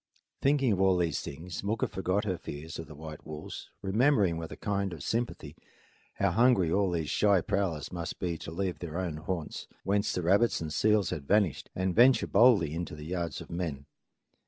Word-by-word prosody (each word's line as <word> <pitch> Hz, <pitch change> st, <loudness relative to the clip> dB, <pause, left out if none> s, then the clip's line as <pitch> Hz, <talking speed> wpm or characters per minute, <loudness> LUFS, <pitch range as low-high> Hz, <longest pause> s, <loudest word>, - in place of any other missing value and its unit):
Thinking 135 Hz, -3 st, +3 dB
of 95 Hz, -2 st, +1 dB
all 95 Hz, -1 st, +4 dB
these 85 Hz, -2 st, 0 dB
things, 85 Hz, +7 st, -7 dB
Mooka 105 Hz, +2 st, 0 dB
forgot 95 Hz, +2 st, -1 dB
her 95 Hz, -4 st, -2 dB
fears 80 Hz, +3 st, -7 dB
of 80 Hz, -, -6 dB
the 75 Hz, -, -11 dB
white 75 Hz, 0 st, -9 dB
wolves, 75 Hz, 0 st, -8 dB
remembering 105 Hz, -, +3 dB
with 80 Hz, -1 st, -6 dB
a -, -, -8 dB
kind 100 Hz, -3 st, -1 dB
of 80 Hz, -, -8 dB
sympathy 120 Hz, +1 st, -3 dB, 0.6 s
how 100 Hz, -2 st, +1 dB
hungry 105 Hz, -5 st, +4 dB
all 100 Hz, 0 st, +2 dB
these 80 Hz, -3 st, -2 dB
shy 100 Hz, -2 st, +4 dB
prowlers 90 Hz, -4 st, -1 dB
must 85 Hz, -2 st, -5 dB
be 85 Hz, -2 st, -2 dB
to -, -, -7 dB
leave 90 Hz, -1 st, -3 dB
their 85 Hz, -1 st, -5 dB
own 90 Hz, -5 st, -2 dB
haunts, 85 Hz, 0 st, -4 dB, 0.2 s
whence 100 Hz, +2 st, +1 dB
the 90 Hz, -, -2 dB
rabbits 100 Hz, +7 st, +3 dB
and 80 Hz, -2 st, -4 dB
seals 105 Hz, 0 st, +2 dB
had 70 Hz, -3 st, -5 dB
vanished, 100 Hz, -7 st, +2 dB
and 95 Hz, 0 st, 0 dB
venture 125 Hz, +5 st, +6 dB
boldly 100 Hz, -, +5 dB
into 85 Hz, -1 st, -4 dB
the 75 Hz, 0 st, -9 dB
yards 85 Hz, -1 st, -3 dB
of -, -, -11 dB
men. 80 Hz, -5 st, -3 dB
90 Hz, 195 wpm, -30 LUFS, 80-100 Hz, 0.6 s, venture